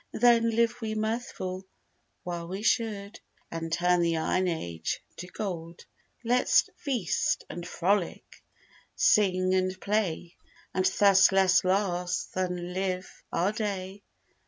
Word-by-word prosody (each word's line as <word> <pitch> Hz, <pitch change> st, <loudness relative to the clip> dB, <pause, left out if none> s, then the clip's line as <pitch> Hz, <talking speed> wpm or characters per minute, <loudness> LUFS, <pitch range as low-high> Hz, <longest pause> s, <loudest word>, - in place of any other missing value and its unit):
Then 235 Hz, 0 st, +4 dB
live 235 Hz, +1 st, +1 dB
we 220 Hz, -1 st, -3 dB
mirthful 215 Hz, -4 st, -3 dB, 0.6 s
while 170 Hz, -1 st, -5 dB
we 190 Hz, +4 st, -5 dB
should, 215 Hz, -3 st, 0 dB, 0.3 s
And 165 Hz, 0 st, -4 dB
turn 180 Hz, +1 st, +2 dB
the 170 Hz, -1 st, +1 dB
iron 185 Hz, +3 st, +1 dB
age 85 Hz, -, -3 dB, 0.2 s
to 180 Hz, -, -7 dB
gold; 175 Hz, -4 st, -6 dB, 0.4 s
Let's 245 Hz, +2 st, +3 dB
feast 245 Hz, -, -1 dB
and 175 Hz, 0 st, -7 dB
frolic, 185 Hz, +1 st, -1 dB, 0.5 s
sing 185 Hz, -3 st, +3 dB
and 185 Hz, 0 st, 0 dB
play, 190 Hz, -5 st, -2 dB, 0.4 s
And 185 Hz, 0 st, 0 dB
thus 195 Hz, -2 st, +5 dB
less 190 Hz, -1 st, +4 dB
last, 185 Hz, -2 st, 0 dB
than 180 Hz, -1 st, -3 dB
live 185 Hz, 0 st, -2 dB, 0.2 s
our 180 Hz, +4 st, +1 dB
day. 200 Hz, -2 st, -4 dB
185 Hz, 120 wpm, -28 LUFS, 180-210 Hz, 0.6 s, thus